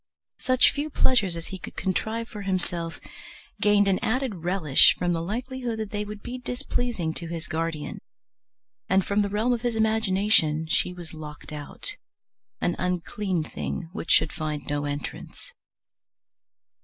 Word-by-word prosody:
Such 255 0 +5
few 295 +2 -2
pleasures 210 - +3
as 165 - -6
he 190 - -6
could - - -9
contrive 220 +4 -1
for 210 - -7
himself 175 -3 -2 0.6
gained 205 -1 +5
an 190 -1 +3
added 250 +1 0
relish 175 -6 +5
from 175 -1 +1
the 165 - -1
likelihood 240 +5 -3
that 220 -2 -4
they 210 -1 -1
would 210 0 -8
be 255 +1 -5
displeasing 245 -8 -2
to 170 - -5
his 165 -1 -5
guardian, 165 -2 -3 0.9
and 190 0 +4
from 205 +1 +2
the 200 - 0
realm 220 +5 +2
of 235 - -2
his 240 -2 0
imagination 205 -7 +3
she 160 +2 +2
was 175 -3 -8
locked 150 -1 -9
out 150 - -3 0.6
an 175 - +1
unclean 180 0 -1
thing, 165 +2 -4
which 200 - -5
should - - +4
find 155 -3 -3
no 145 0 -1
entrance. 145 0 -6
190 Hz, 155 wpm, -26 LUFS, 165-220 Hz, 0.9 s, Such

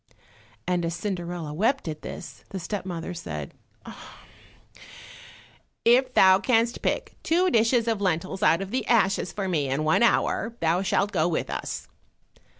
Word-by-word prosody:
And 180 -1 0
as 165 0 -2
Cinderella 175 -4 -4
wept 225 - 0
at 155 -1 -5
this, - - -9
the 195 - -5
step 190 +1 -5
mother 175 0 -5
said, 80 - -6 2.3
"If 255 +2 +4
thou 190 0 +7
canst 230 +3 +1
pick - - -2
two 360 +3 +2
dishes 230 +1 +3
of 220 -3 0
lentils 185 +1 -1
out 170 +4 +3
of 195 - -9
the 255 - -1
ashes 195 -6 +2
for 195 -2 -3
me 150 -7 0
in 135 +3 -1
one 155 +7 +2
hour, 235 0 +2
thou 165 +3 +1
shalt 200 +1 +1
go 165 -2 +1
with 170 - -2
us." - - -5
190 Hz, 150 wpm, -25 LUFS, 170-230 Hz, 2.3 s, thou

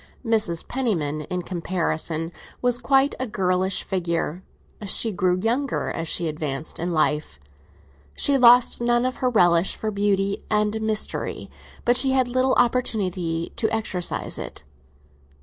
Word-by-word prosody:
Mrs. 215 -7 0
Penniman, 170 - -1
in 180 0 -2
comparison, 165 -2 -2 0.3
was 245 -1 +1
quite 270 +3 +3
a 260 - -2
girlish 185 -2 0
figure; 170 -2 -2 0.4
she 215 +3 +2
grew 185 -2 +1
younger 245 +7 -1
as 165 0 -4
she 170 +1 0
advanced 150 -1 -4
in 175 +2 -2
life. 155 - 0 0.8
She 285 - +2
lost 245 -2 +6
none 240 +1 +2
of 255 +1 -2
her 255 - +1
relish 175 -5 +3
for 215 - -3
beauty 200 -1 0
and 210 +1 +1
mystery, 220 -1 -2 0.3
but 245 0 +4
she 265 0 +3
had 260 -2 +2
little 255 +1 +1
opportunity 190 -9 0
to 220 - +1
exercise 190 -5 -2
it. - - -7
200 Hz, 135 wpm, -23 LUFS, 170-240 Hz, 0.8 s, lost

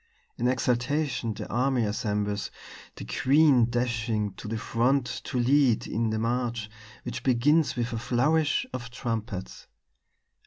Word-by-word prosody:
In 120 - 0
exultation 125 -1 0
the - - -6
army 125 +1 +1
assembles, 105 -1 -1 0.5
the - - -8
queen 130 - +4
dashing 115 -4 -1
to 100 - -9
the 110 +1 -2
front 120 +4 +1 0.2
to 130 - -3
lead 125 -1 +3
in 115 0 -1
the 110 - -1
march, 115 -1 -2 0.3
which 120 +1 -5
begins 140 +6 +3
with 120 -1 -2
a 115 - -2
flourish 145 +7 +1
of 125 -2 -5
trumpets. 115 -5 -5
120 Hz, 130 wpm, -27 LUFS, 110-130 Hz, 0.5 s, queen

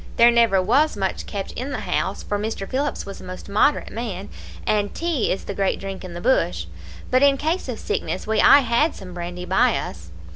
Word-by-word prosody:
There 235 +1 +7
never 230 -5 +4
was 270 +7 +2
much 190 -1 -2
kept 200 -2 -4
in 255 +3 -5
the 270 - -3
house, 190 - -2
for 205 - -2
Mr. 210 -2 -3
Phillips 280 +3 -2
was 195 0 -8
a - - -11
most 185 0 -8
moderate 210 +9 +2
man, 210 -4 -5 0.4
and 205 -1 +1
tea 335 -8 0
is 190 - -2
the 200 - -5
great 195 -1 0
drink 195 -1 -6
in 180 -2 -8
the - - -5
bush; 90 - +1 0.5
but 255 - +4
in 280 -1 +5
case 320 +6 -1
of - - -3
sickness - - -3
we 220 0 +2
aye 285 - +8
had 255 +6 +1
some 185 -2 -10
brandy 175 0 -5
by - - +3
us. 85 0 -7
210 Hz, 215 wpm, -23 LUFS, 190-260 Hz, 0.5 s, aye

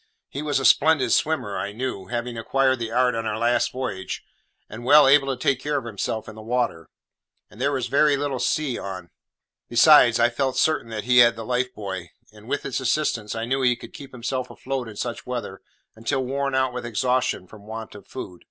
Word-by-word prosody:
He 140 - -5
was 150 -2 0
a 135 - -2
splendid 140 -1 +4
swimmer, 155 -10 0
I 100 - -4
knew, 110 -5 -4
having 120 +1 -3
acquired 130 +3 +1
the 115 -1 -3
art 125 +1 +2
on 115 0 -2
our 110 0 -2
last 120 +2 +1
voyage, 125 -8 -5 0.4
and 110 +3 -9
well 145 +2 +7
able 140 0 +5
to 130 -2 -2
take 130 0 +1
care 145 +1 -1
of 130 - -4
himself 110 0 -4
in 110 - -8
the 110 - -11
water; 115 -8 -2 0.6
and 110 - -12
there 140 +2 +2
was 130 -4 -1
very 140 +3 +3
little 140 -2 -2
sea 130 +1 0
on. 95 -3 -7 0.6
Besides, 120 -1 +6
I 120 0 +4
felt 130 +2 -1
pretty - - 0 0.3
certain 110 -2 -5
he 125 +2 +4
had 120 -1 +6
the 115 -1 -7
life 125 +2 0
buoy; 95 -4 -6 0.2
and, 105 +1 -16
with 145 - -2
its 140 - -2
assistance, 125 -5 -1
I 115 0 -3
knew 135 +3 0
he 125 -1 +3
could - - -12
keep 140 -1 -10
himself 125 +1 -4
afloat 130 -2 -4
in 105 - -10
such 120 +2 -5
weather 120 -6 -5 0.3
until 130 +4 -2
worn 140 +1 -1
out 130 -1 +1
with 125 - -5
exhaustion 125 -2 0
from 105 +2 -15
want 110 0 -7
of 100 - -13
food. 90 -9 -8
125 Hz, 215 wpm, -24 LUFS, 110-135 Hz, 0.6 s, well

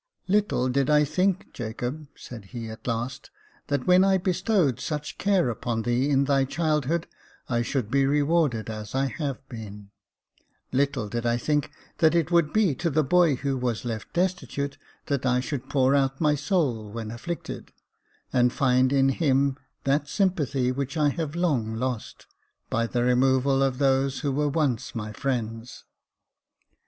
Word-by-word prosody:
" - - -47
Little 200 -9 +2
did 135 +2 +1
I 150 0 +5
think, 185 +5 0
Jacob," 125 +6 -5
said 115 -5 -10
he, 115 +2 -7
at 110 - -11
last, 120 +2 -3 0.2
" 425 - -33
that 140 -3 -1
when 180 +1 +6
I 195 0 +4
bestowed 185 - +1
such 150 -1 -4
care 195 -6 +2
upon 115 0 -3
thee 125 +4 +1
in 140 -1 +3
thy 140 -1 +2
childhood 155 +2 0 0.4
I 120 -2 0
should 120 -2 -2
be 135 0 +3
rewarded 145 -5 +1
as 110 +1 -6
I 135 +1 +2
have 135 0 -4
been! 105 -4 -9 0.8
Little 135 -4 0
did 120 +3 -2
I 120 0 +2
think 145 +3 0 0.3
that 160 -1 +4
it 165 0 +1
would 170 -3 +3
be 215 -8 +3
to 175 -1 0
the 155 +1 +2
boy 170 0 +4
who 135 +1 -2
was 125 -3 -2
left 115 -2 -5
destitute 175 -6 -1 0.3
that 140 -3 -1
I 125 -1 +2
should 130 0 -4
pour 135 -1 +3
out 135 -1 +1
my 150 -2 +3
soul 145 - 0
when 110 0 -6
afflicted, 170 +9 -6 0.6
and 125 -1 +4
find 130 0 +2
in 135 -1 +4
him 135 -1 +2 0.3
that 140 +2 +1
sympathy 145 - 0
which 140 +3 -3
I 150 -1 +3
have 155 +1 -3
long 135 -11 0
lost, 125 -1 -4 0.5
by 115 0 +1
the 120 0 0
removal 130 +2 +3
of 135 -2 +1
those 135 -1 +1
who 140 - 0
were 145 +2 +1
once 140 -7 -1
my 105 -1 -4
friends 115 -2 -4
135 Hz, 165 wpm, -26 LUFS, 125-150 Hz, 0.8 s, when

